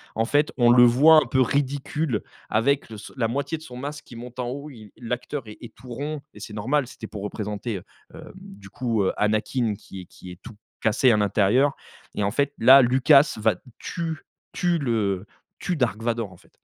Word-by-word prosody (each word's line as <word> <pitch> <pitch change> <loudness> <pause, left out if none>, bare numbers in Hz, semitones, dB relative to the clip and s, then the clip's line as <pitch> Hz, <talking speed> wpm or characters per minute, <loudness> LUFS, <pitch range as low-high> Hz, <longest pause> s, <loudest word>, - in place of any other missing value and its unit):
En 115 - +1
fait 145 +5 +1
on 120 -1 +5
le 120 0 +7
voit 140 +7 +7
un - - +5
peu 130 -2 +2
ridicule 140 -1 -1 0.3
avec 135 +4 +1
le 110 - -8
ce - - -11
la 115 -3 +1
moitié 140 +6 -2
de 155 - -14
son 125 -3 -10
masque 145 +3 -6
qui 120 - -13
monte 125 +2 -10
en 120 - -2
haut, 140 +3 -6
il 110 -6 -13
l'acteur 125 +4 -4
est 105 - -10
est 120 - -10
tout 125 +3 -14
rond 145 +4 -4
et - - -13
c'est 105 - -9
normal 130 +5 0
c'était 110 - -9
pour 105 -2 -8
représenter, 105 +1 -4
heu, 90 - -10 0.3
hem, - - -11
du 100 0 -13
coup, 115 -2 -1
heu, - - 0
Anakin 110 +2 0
qui 95 -1 -10
est - - -12
qui 90 +1 -13
est 90 - -13
tout 120 -2 -11 0.3
cassé 120 +3 +3
à 110 - +3
l'intérieur 105 +7 +2 0.4
et 105 - -1
en 100 - 0
fait 140 +2 0
là 130 +4 +8
Lucas 135 +4 +5
va 110 - +2 0.2
tue 165 -2 -4 0.3
tue 175 -1 +1
le 105 - -1 0.3
tue 180 - -2
Dark 115 -5 -1
Vador 115 -4 -2
en 90 - -15
fait. - - -24
120 Hz, 215 wpm, -24 LUFS, 110-140 Hz, 0.4 s, là